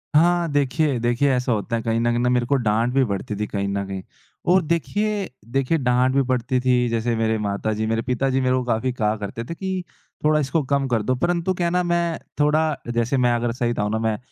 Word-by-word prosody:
हाँ, 175 +2 +4
देखिए 145 -1 +1
देखिए 120 +4 +1
ऐसा 125 0 0
होता 115 +1 -1
है 115 - -1
कहीं 115 0 0
न - - 0
कहीं 120 - 0
ना 125 +1 +2
मेरे 125 -1 +2
को 140 +4 +1
डाँट 115 0 +1
भी 135 - +4
पड़ती 100 0 -3
थी 105 - -1
कहीं 100 -1 -2
न 100 0 -2
कहीं 95 -1 -5 0.5
और 185 - +5
देखिए 195 - -1 0.2
देखिए 135 +5 +1
डाँट 125 -1 +2
भी 140 - +4
पड़ती 125 0 0
थी, 125 -1 +2
जैसे 115 0 0
मेरे 110 0 +1
माता 105 +1 -2
जी, 110 +1 -2
मेरे 115 0 0
पिता 125 +2 0
जी 135 0 +1
मेरे 130 0 +2
को 130 - 0
काफ़ी 120 +1 0
कहा 110 -3 0
करते 105 +3 -5
थे 170 - -6
कि 190 0 -3 0.4
थोड़ा 155 0 +4
इसको 150 +2 0
कम 140 0 0
कर 120 -3 +1
दो, 130 +4 +1
परंतु 175 +6 0
क्या 175 -1 -1
है - - -1
ना 180 +1 +2
मैं 170 -1 0 0.2
थोड़ा 150 0 +2 0.2
जैसे 120 +3 +1
मैं 125 -2 +3
अगर 120 0 -1
सही 120 -1 -1
बताऊँ 105 -1 -1
ना 110 - 0
मैं 110 -1 0
125 Hz, 245 wpm, -22 LUFS, 115-150 Hz, 0.5 s, और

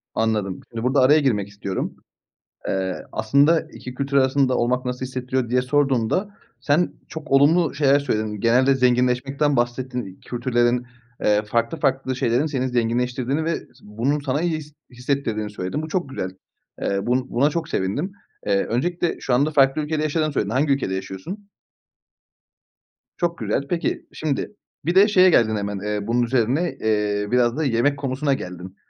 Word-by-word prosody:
Anladım. 105 -4 -1
Şimdi 115 -1 -5
burada 130 +2 +2
araya 145 +4 +6
girmek 105 -8 +1
istiyorum. 100 -2 -4 0.7
Eee, 95 -1 -2
aslında 140 +9 +3
2 125 0 -9
kültür 140 +1 -2
arasında 130 -1 +3
olmak 125 +2 0
nasıl 125 +1 -3
hissettiriyor 130 -1 -2
diye 125 0 +2
sorduğumda, 140 - 0 0.2
sen 145 +6 +2 0.2
çok 155 -2 -8
olumlu 150 +5 +4
şeyler 140 -1 +4
söyledin. 110 -6 -2
Genelde 130 +4 +4
zenginleşmekten 125 +3 +2
bahsettin. 120 -4 -2
Kültürlerin, 120 0 0 0.3
eee, 105 0 +3
farklı 115 +9 -1
farklı 135 -2 0
şeylerin 125 +4 +1
seni 130 -4 -1
zenginleştirdiğini 125 +4 0
ve 165 0 0
s - - -15 0.2
bunun 120 +8 -1
sana 140 +2 -1
iyi 165 -2 0
his 150 -1 -11 0.2
hissettirdiğini 120 -5 -2
söyledin. 105 +9 -4
Bu 155 - -5
çok 175 -2 -2
güzel. 95 -8 -4 0.5
Eee, 100 0 0
bu 125 +1 0
buna 140 +5 +2
çok 165 0 -3
sevindim. 140 - -2 0.3
Eee, 100 -1 +2
öncelikle 170 +8 -1
şu 125 - 0
anda 145 +5 +2
farklı 140 0 +3
ülkede 150 0 -2
yaşadığını 155 0 0
söyledin. 105 -6 -1
Hangi 140 +4 +2
ülkede 115 -9 -1
yaşıyorsun? 95 - -7 1.7
Çok 170 -1 -1
güzel. 110 +5 -1
Peki, 170 -1 -2
şimdi 155 +6 -3 0.3
bir 175 +2 0
de 200 +2 +7
şeye 185 -3 +6
geldin 110 -8 +3
hemen, 100 -1 -3
eee, 105 +1 -3
bunun 120 +1 +2
üzerine, 130 +8 0
eee, 105 -1 0
biraz 125 +1 +2
da 160 - 0
yemek 135 +2 +1
konusuna 140 +1 0
geldin. 90 -4 -7
130 Hz, 160 wpm, -22 LUFS, 115-145 Hz, 1.7 s, de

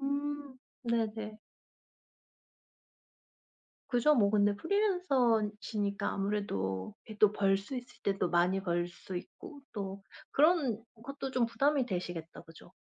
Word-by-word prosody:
음. 285 -1 -3 0.3
네네. 220 -2 -1 2.5
그죠 250 +5 +4
뭐 205 -7 +4
근데 205 -1 +4
프리랜서시니까 235 - +1
아무래도 195 - -2
왜 215 - -8
또 210 -1 +6
벌 195 -2 +3
수 230 +7 -6
있을 245 0 -9
때 195 -1 +1
또 180 - +1
많이 180 +3 +3
벌 175 -1 0
수 180 +1 -8
있고 290 - -9
또 195 -1 -5 0.3
그런 285 - +3 0.2
것도 275 0 -5
좀 250 -3 +2
부담이 275 +2 +2
되시겠다, 175 -4 -4
그죠? 165 +2 -16
215 Hz, 225 characters per minute, -32 LUFS, 195-275 Hz, 2.5 s, 또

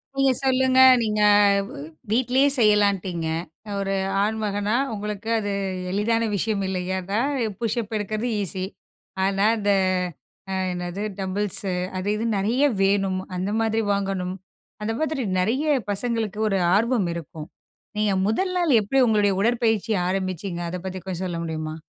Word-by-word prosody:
நீங்க 270 -1 +3
சொல்லுங்க. 260 0 +3 0.2
நீங்க 210 -1 0 0.5
வ் - - -8 0.3
வீட்டிலேயே 255 +3 +3
செய்யலான்ட்டீங்க. 200 -6 +2 0.5
ஒரு 195 0 -1 0.3
ஆண்மகனா 210 0 -1 0.2
உங்களுக்கு 210 +1 -5
அது 205 -1 -3 0.4
எளிதான 225 +3 +1
விஷயம். 205 0 -1
இல்லயா! 185 0 -2
அதா 200 +4 -1 0.4
புஷ்ஸப் 225 -1 -2
எடுக்கிறது 215 +3 -2
ஈஸி. 185 0 -3 0.6
ஆனா, 195 +1 +1
அந்த 205 -1 -1 0.8
அ - - -1 0.2
என்னது 180 +2 -4 0.2
டம்புள்ஸு 195 0 -2 0.3
அது 190 +2 -3
இதுன்னு 220 -1 -1
நிறைய 235 +8 +1 0.2
வேணும். 195 -1 +1 0.2
அந்த 185 +3 -2
மாதிரி 225 0 +1
வாங்கணும். 195 -2 -2 0.5
அந்த 225 +1 -1
மாதிரி 310 -3 -1 0.2
நிறைய 250 +11 0 0.2
பசங்களுக்கு 220 -1 -1
ஒரு 195 -2 +1 0.2
ஆர்வம் 225 -3 +2
இருக்கும். 160 -1 -8 0.5
நீங்க 210 -2 +2
முதல் 370 - 0
நாள் 330 -9 +3
எப்பிடி 265 +7 +1
உங்களுடைய 210 -3 +3
உடற்பயிற்சி 225 -1 +1 0.2
ஆரம்பிச்சிங்க. 185 -1 -3
அத 180 - -4
பத்தி 185 0 -4
கொஞ்சம் 185 -1 -4
சொல்ல 175 -2 -3
முடியுமா? 155 -1 -4
205 Hz, 130 wpm, -24 LUFS, 190-225 Hz, 0.8 s, நீங்க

